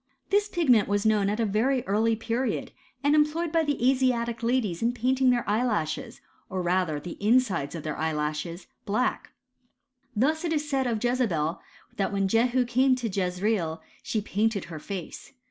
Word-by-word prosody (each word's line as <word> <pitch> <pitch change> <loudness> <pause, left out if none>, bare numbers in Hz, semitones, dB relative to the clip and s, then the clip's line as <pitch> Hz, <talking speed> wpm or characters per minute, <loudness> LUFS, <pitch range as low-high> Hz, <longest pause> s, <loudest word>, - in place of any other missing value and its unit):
Hiis 410 +1 +2
pigment 255 - +3
was 205 +1 0
known 210 -2 +3
at 210 +2 -2
a 230 - +2
very 235 +5 +1
early 220 +3 +2
period, 230 +1 -2 0.3
and 285 +1 +3
employed 305 +2 +2
by 330 -1 +2
the 290 -5 0
Asiatic 245 -3 0
ladies 230 -7 0
in 235 +1 +1
painting 255 +2 +2
their 245 -1 +1
eyelashes, 210 -8 -1 0.3
or 185 -1 -2
rather 175 -4 +1
the 170 +4 -8
insides 210 - +2
of 160 - -6
their 155 -1 -3
eyelashes, 155 +2 -3 0.2
black. 230 +6 -1 0.8
Thus 305 +9 +1
it 330 -2 0
is 300 -1 -1
said 270 -3 0
of 225 -2 -1
Jezebel, 200 -11 0 0.4
that 195 - 0
when 195 -1 +1
Jehu 240 +4 +2
came 255 +2 +3
to 245 -2 -3
Jezreel 180 -2 -1 0.2
she 215 - -2
painted 210 0 0
her 155 - -5
face. 190 - -7
225 Hz, 165 wpm, -27 LUFS, 190-255 Hz, 0.8 s, pigment